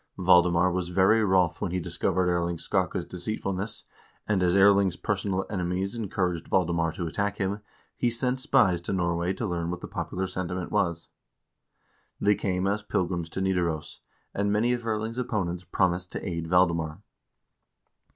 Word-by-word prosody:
Valdemar 90 -1 +4
was 90 0 -2
very 95 +5 +4
wroth 95 -4 +2
when 100 - -1
he 90 +1 -1
discovered 90 +1 0
Erling 85 -1 0
Skakke's 90 0 -1
deceitfulness, 100 +2 -3 0.4
and 100 -3 +1
as 90 0 +3
Erling's 100 -2 +5
personal 95 0 -1
enemies 95 0 -2
encouraged 90 -6 -2
Valdemar 85 -3 +1
to 85 - -4
attack 100 +5 -2
him, 100 +1 -1 0.4
he 120 - +1
sent 125 +2 -1
spies 120 - +3
to 85 - -3
Norway 85 -1 0
to 115 - -4
learn 85 -3 -2
what 90 0 -3
the - - -6
popular 95 +1 -3
sentiment 90 -1 -4
was. 85 -5 0 1.1
They 105 - +4
came 95 -2 -1
as 100 +2 0
pilgrims 90 -4 -2
to 95 - -4
Nidaros, 90 -5 -1 0.3
and 100 0 0
many 115 +4 +2
of 120 -1 -4
Erling's 110 +2 -2
opponents 90 -8 -2
promised 90 0 0
to - - -5
aid 85 -2 -3
Valdemar. 85 0 +1
90 Hz, 155 wpm, -27 LUFS, 85-100 Hz, 1.1 s, Erling's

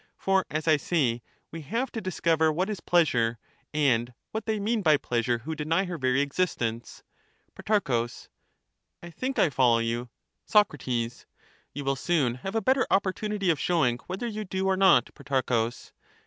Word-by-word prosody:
For, 195 -1 +1
as 155 +1 -3
I 155 -1 +5
say, 135 -7 0 0.3
we 165 - -7
have 230 - -2
to 225 - -4
dis 185 -3 -5
cover 160 -1 +3
what 185 +7 -1
is 205 - -4
pleasure, 120 -11 +2 0.3
and 125 -5 +1 0.2
what 220 0 -5
they 220 -1 0
mean 215 +2 0
by 155 -5 +4
pleasure 120 -2 -1
who 160 - -3
deny 160 +5 0
her 175 -3 -5
very 130 +1 +2
existence. 135 -7 -2 0.5
Pro, 135 - 0 1.0
I 175 - -9
think 255 - -4
I 160 - +3
follow 125 -4 +4
you. 115 +1 -2 0.4
Soc, 210 -2 +4 0.2
You 120 -1 -2 0.6
will 135 0 0
soon 140 -4 +1
have 195 +7 -5
a 225 - +2
better 260 +4 +2
opportunity 200 0 +1
of 155 - -2
showing 130 -10 +1
whether 190 +6 -4
you 215 -2 -4
do 190 -1 -3
or 190 0 +2
not, 190 -1 +4
Protarchus. 125 -5 -2
160 Hz, 165 wpm, -27 LUFS, 125-195 Hz, 1.0 s, I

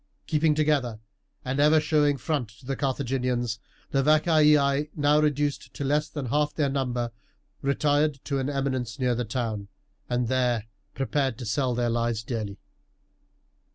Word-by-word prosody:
Keeping 155 -1 +2
together, 145 -7 +1 0.5
and 130 +2 -1
ever 150 +2 +6
showing 150 -2 +2
front 135 -4 -2
to 130 - -17
the 135 +1 -2
Carthaginians, 125 -4 -1 0.3
the 135 - +2
Vacaei, 150 -1 +4
now 145 0 +3
reduced 145 -1 0
to - - -4
less 150 +2 +1
than 145 -2 -5
half 150 +4 0
their 145 -3 +1
number, 125 -3 -1 0.5
retired 145 +1 +1
to 140 -2 -1
an 135 +1 -1
eminence 135 -3 -2
near 125 -2 +1
the 120 0 -2
town, 110 -3 -3 0.4
and 125 -1 0
there 125 -3 +1 0.3
prepared 135 -2 0
to 125 - -6
sell 125 +3 0
their 120 0 +1
lives 115 -1 0
dearly. 110 -4 -4
135 Hz, 150 wpm, -26 LUFS, 120-150 Hz, 0.5 s, ever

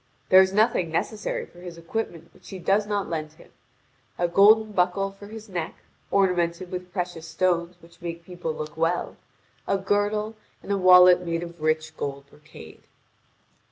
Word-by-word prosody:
There 185 0 +9
is 190 0 +2
nothing 205 -4 +2
necessary 210 +6 -2
for 175 - -18
his 175 -1 -9
equipment 170 -2 -5
which - - -22
she 195 - -8
does 200 +3 +1
not 205 -2 -1
lend 155 -2 -4
to 155 - -26
him: - - -18 0.7
a 175 - +1
golden 215 +4 +5
buckle 195 +1 0
for 195 +1 -13
his 220 +1 -10
neck, 175 -5 -4 0.3
ornamented 180 -2 +1
with 180 0 -6
precious 175 -3 -4
stones 170 +1 0
which 170 +1 -19
make 170 -1 -6
people 175 -2 -5
look 155 -1 -7
well, 165 +2 -1 0.5
a 195 - +2
girdle, 205 +2 0 0.3
and - - -6
a 200 - +2
wallet 180 -1 +7
made 170 0 -2
of 170 -1 -10
rich 155 0 -1
gold 140 0 -5
brocade. 150 - -14
180 Hz, 170 wpm, -25 LUFS, 165-195 Hz, 0.7 s, There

